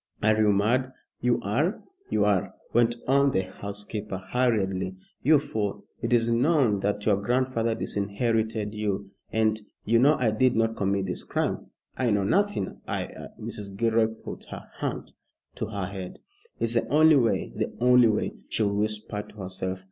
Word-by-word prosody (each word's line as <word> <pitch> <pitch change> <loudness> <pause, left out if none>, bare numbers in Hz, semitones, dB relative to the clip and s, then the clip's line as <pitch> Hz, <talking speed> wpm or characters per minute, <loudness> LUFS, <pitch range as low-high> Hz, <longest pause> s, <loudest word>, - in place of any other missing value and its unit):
"Are 110 +1 +5
you 105 -1 +4
mad?" 120 +6 +1 0.3
"You 120 0 +2
are, 140 - 0 0.3
you 105 - +2
are," 100 -3 +1 0.2
went 120 0 +4
on 140 0 +4
the 95 - +3
housekeeper, 100 +1 -6
hurriedly, 95 -7 +1 0.3
"you 155 +3 +6
fool! 110 -8 -3 0.2
It - - -2
is 115 -1 +3
known 125 -4 +3
that 105 +1 -1
your 105 -3 +4
grandfather 115 +1 0
disinherited 110 +1 -1
you, 100 -2 -2 0.2
and 110 -1 +1
" - - -55
"You 115 +2 +4
know 145 +5 +5
I 120 -4 +2
did 125 +4 +3
not 115 0 +1
commit 100 0 0
this 90 - -3
crime." - - -2 0.3
"I 125 -2 +1
know 100 -2 +2
nothing. 200 - 0
I - - -1
I" - - -9
Mrs. 100 -1 -7
Gilroy 115 0 +3
put 110 0 -9
her - - -9
hand - - -4 0.4
to - - -4
her 100 -3 -3
head. 95 -1 -7 0.4
"It's 115 - 0
the 115 - +1
only 155 +1 +6
way 115 -4 +1
the - - -2
only 125 0 +6
way," 110 -1 0 0.2
she 110 - 0
whispered 105 0 -2
to - - -16
herself. 95 0 -4
110 Hz, 170 wpm, -27 LUFS, 100-120 Hz, 0.4 s, you